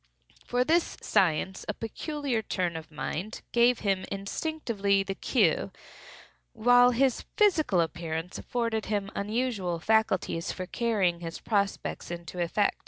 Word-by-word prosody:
For 245 0 +2
this 330 +5 +1
science 190 -1 +1
a - - -1
peculiar 275 +1 -3
turn 180 -5 -2
of 160 -1 -7
mind 170 +6 -5
gave 240 0 +4
him 195 -2 +1
instinctively 200 - -1
the 195 0 -3
cue, - - +1 0.8
while 245 +2 +6
his 255 +1 +1
physical 330 - +4
appearance 165 +1 -3
afforded 230 -3 -2
him 205 -1 -1
unusual 205 -4 -1
facilities 190 -3 +1
for 185 - -5
carrying 195 -5 0
his 165 -1 -6
prospects 200 -3 -1
into 175 +1 -6
effect. 200 +4 +1
205 Hz, 125 wpm, -28 LUFS, 180-240 Hz, 0.8 s, while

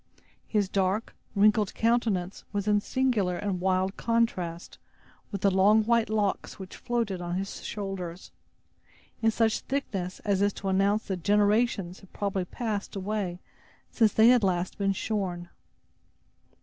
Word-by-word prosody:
His 210 -3 +1
dark, 195 +3 0 0.2
wrinkled 210 0 +3
countenance 220 -6 0
was 200 0 -2
in 205 -1 +3
singular 220 -9 0
and 200 -3 -2
wild 190 +1 +1
contrast 185 -8 -1 0.5
with 200 -3 -4
the 200 - +4
long 205 +4 +5
white 230 0 +2
locks 210 -2 -1
which 190 -1 -9
floated 230 -7 -2
on 175 0 -3
his 195 +1 -4
shoulders, 195 -4 -5 0.9
in 225 - +4
such 225 0 +1
thickness, 195 -10 -3
as 200 0 +2
to 195 - -4
announce 200 +3 +2
that 185 -4 -4
generations 205 -2 +2
had 195 - -18
probably 195 -2 -2
passed 210 0 -4
away 195 -2 -3 0.5
since 220 -3 +3
they 220 +3 +6
had 245 -3 +5
last 180 0 0
been 195 -1 +2
shorn. 185 -4 -3
200 Hz, 135 wpm, -28 LUFS, 185-220 Hz, 0.9 s, they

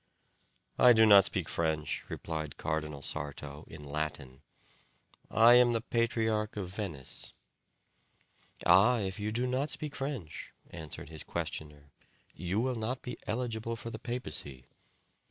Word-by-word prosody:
"I 125 -1 +8
do 110 -1 +6
not 100 -3 +8
speak 95 -6 -1
French," 80 -2 -1
replied 80 -3 -5
Cardinal 75 -2 -3
Sarto, 70 +1 -5
in 75 - -11
Latin; 70 -3 -4 0.9
"I 115 +2 +7
am 120 -1 +6
the 115 - +1
patriarch 110 -2 0
of 95 -3 -3
Venice." 85 - -4 1.3
"Ah! 100 +8 +6
if 95 -2 -3
you 105 +1 -2
do 120 +3 0
not 130 +4 0
speak 150 -1 -3
French," 135 - -5 0.2
answered 80 -4 -8
his 80 -2 -5
questioner, 75 -2 -5 0.4
"you 90 +3 -2
will 130 +2 +1
not 120 +3 -3
be 125 -2 -6
eligible 115 0 -2
for 115 0 -7
the - - -7
papacy." 75 - -4
105 Hz, 135 wpm, -31 LUFS, 75-115 Hz, 1.3 s, I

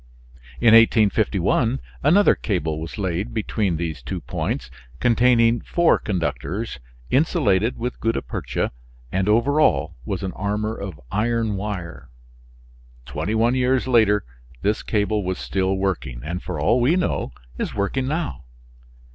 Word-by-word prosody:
In 115 -2 +5
1851 110 +1 +3 0.2
another 185 +9 +5
cable 80 -7 -2
was 80 +7 -7
laid 95 +3 -2
between 105 -5 0
these 80 -2 -4
two - - -4
points, - - -4 0.3
containing 120 -1 +4
four 170 -1 +2
conductors 85 - -3 0.3
insulated 130 - +2
with 125 +2 -4
gutta 115 +1 0
percha, - - -3 0.4
and 95 +2 0
over 125 +8 +3
all 70 - +2
was 95 +6 -4
an 95 - -2
armor 105 +2 -2
of 95 -8 -7
iron 115 0 0
wire. 95 - -5 1.0
Twenty 105 - -3
one 115 +2 +3
years 130 0 +1
later 110 -5 +3 0.4
this 105 +2 +1
cable 105 -1 0
was 95 0 -2
still 95 0 -1
working, 90 -11 -2
and 85 +3 -4
for 90 -4 -5
all 115 +12 +3
we 140 +8 +3
know 180 - -1 0.3
is - - -3
working 115 +6 -1
now. 150 - -3
105 Hz, 135 wpm, -22 LUFS, 95-120 Hz, 1.0 s, In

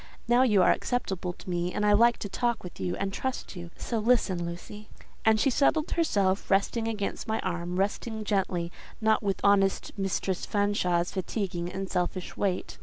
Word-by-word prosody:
Now 240 +2 +5
you 210 -7 +5
are - - +6
acceptable 190 -7 -1
to - - -15
me, 175 0 -1
and 210 - -1
I 205 - +5
like 235 +3 +5
to - - -1
talk 235 +4 -1
with 180 - -9
and 195 +2 -2
trust 260 -3 -4
you. 175 -1 -7
So 230 - -2
listen, 210 -6 +2
Lucy." 205 +5 -8 0.4
And 220 -1 +5
she 270 - +3
settled 305 +4 +2
herself, 200 - +1
resting 205 +4 +2
against 210 -3 -3
my 220 0 0
arm—resting 190 +5 -2
gently, 185 -4 -1 0.3
not 220 -1 +3
with 200 -3 -1
honest 195 -1 +3
Mistress 195 -1 -1
Fanshawe's 185 -4 +1
fatiguing 180 -2 -3
and 195 0 -4
selfish 180 0 -2
weight. 190 -3 -2
195 Hz, 170 wpm, -28 LUFS, 180-220 Hz, 0.4 s, are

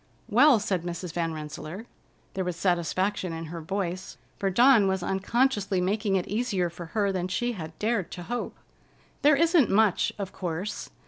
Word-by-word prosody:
"Well," 255 +2 +6
said 195 -3 -1
Mrs. 175 0 -5
Van 165 -2 -1
Rensselaer—there 160 +5 -8
was 180 -1 -3
satisfaction 180 +1 0
in 165 0 -5
her 170 - -5
voice, 185 +1 -4 0.2
for 195 - +1
Dawn 235 +1 +5
was 190 -1 0
unconsciously 200 0 +1
making 200 +2 0
it 185 - 0
easier 200 -6 -1
for 170 0 -8
her 200 -2 +2
than 185 -1 -2
she 240 +6 -1
had 160 -7 -7
dared 210 -5 0
to 175 - -7
hope—"there 245 - -2
isn't 325 - +4
much, 210 -2 +3
of 195 -2 -5
course. 180 +3 -4
190 Hz, 155 wpm, -27 LUFS, 175-220 Hz, 0.2 s, Well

